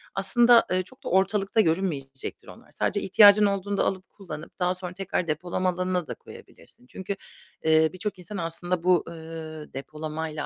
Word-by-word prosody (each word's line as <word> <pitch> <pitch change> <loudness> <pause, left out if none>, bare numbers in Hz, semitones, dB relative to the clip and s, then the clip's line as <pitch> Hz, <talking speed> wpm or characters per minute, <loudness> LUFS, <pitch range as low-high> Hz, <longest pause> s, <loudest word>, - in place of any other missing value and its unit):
aslında, 235 +4 +5
eee, 185 0 +1
çok - - -18
da - - -4
ortalıkta 195 +3 +2
görünmeyecektir 160 -7 -2
onlar. - - -14
Sadece 205 - -1
ihtiyacın 205 +2 +7
olduğunda 200 0 0
alıp, 190 -1 -3
kullanıp 170 -4 -10
daha 180 0 +2
sonra 180 -1 -5
tekrar 185 -2 -2
depolama 175 +4 -1
alanına 180 -2 -1
da - - -4
koyabilirsin. 125 - -15
Çünkü, 190 +5 -5 0.5
eee, 160 0 +4
birçok 185 +1 -4
insan 190 +3 -7
aslında 170 +1 -2
bu, 180 -3 +4
ııı, 160 -2 -8
depolamayla 155 +2 -5
180 Hz, 155 wpm, -26 LUFS, 160-195 Hz, 0.5 s, ihtiyacın